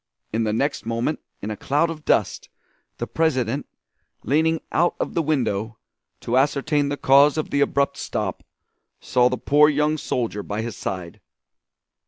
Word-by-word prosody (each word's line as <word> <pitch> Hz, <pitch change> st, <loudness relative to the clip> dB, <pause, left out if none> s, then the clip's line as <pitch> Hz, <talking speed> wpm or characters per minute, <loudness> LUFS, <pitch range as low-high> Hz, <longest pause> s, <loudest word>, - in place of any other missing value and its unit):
In 115 Hz, 0 st, +1 dB
the 105 Hz, -, 0 dB
next 140 Hz, +6 st, -1 dB
moment, 115 Hz, +6 st, -1 dB, 0.2 s
in 105 Hz, -, -3 dB
a -, -, -3 dB
cloud 150 Hz, +9 st, 0 dB
of 155 Hz, -2 st, -9 dB
dust, -, -, +1 dB, 0.5 s
the -, -, -3 dB
President, 140 Hz, -5 st, 0 dB, 0.6 s
leaning 160 Hz, +3 st, +2 dB
out 175 Hz, +2 st, +2 dB
of -, -, -2 dB
the 170 Hz, -, +1 dB
window, 115 Hz, -8 st, -1 dB, 0.4 s
to 120 Hz, -, 0 dB
ascertain 145 Hz, +1 st, +1 dB
the 145 Hz, -, -2 dB
cause 140 Hz, +3 st, +5 dB
of 155 Hz, -, -2 dB
the 140 Hz, -, +1 dB
abrupt 140 Hz, 0 st, +1 dB
stop, -, -, -3 dB, 0.6 s
saw 125 Hz, -1 st, +2 dB
the 125 Hz, -, -2 dB
poor 150 Hz, +3 st, +4 dB
young 150 Hz, +1 st, +1 dB
soldier 115 Hz, -7 st, -2 dB
by 105 Hz, +2 st, -4 dB
his 115 Hz, -2 st, -5 dB
side. 90 Hz, -3 st, -6 dB
140 Hz, 160 wpm, -23 LUFS, 115-150 Hz, 0.6 s, cause